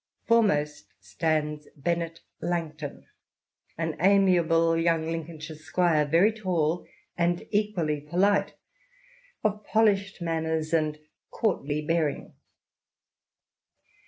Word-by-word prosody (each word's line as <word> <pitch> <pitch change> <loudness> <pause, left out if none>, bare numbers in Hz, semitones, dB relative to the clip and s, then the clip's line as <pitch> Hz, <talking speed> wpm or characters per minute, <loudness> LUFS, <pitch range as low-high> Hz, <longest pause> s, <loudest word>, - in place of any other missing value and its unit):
Foremost 150 - +2
stands 150 +9 -2
Bennet 165 +2 -2 0.2
Langto 160 -3 -2
n. - - -18 0.7
an 165 -1 -2
amiable 170 -3 +4
young 165 -1 +1
Lincolnshire 160 -1 -5
squire, 155 0 +1
very 170 +8 +4
tall 175 -6 -1 0.3
and 175 0 0
equally 190 -8 0
polite, 185 +7 +1 0.9
of 210 0 0
polished 200 -3 +2
manners 160 -1 -2
and 155 -2 +1
INTRODUCTION. 155 0 -26
xxi - - -47
courtly 150 -9 -1
bearing. 160 -2 -1
165 Hz, 100 wpm, -27 LUFS, 155-180 Hz, 0.9 s, amiable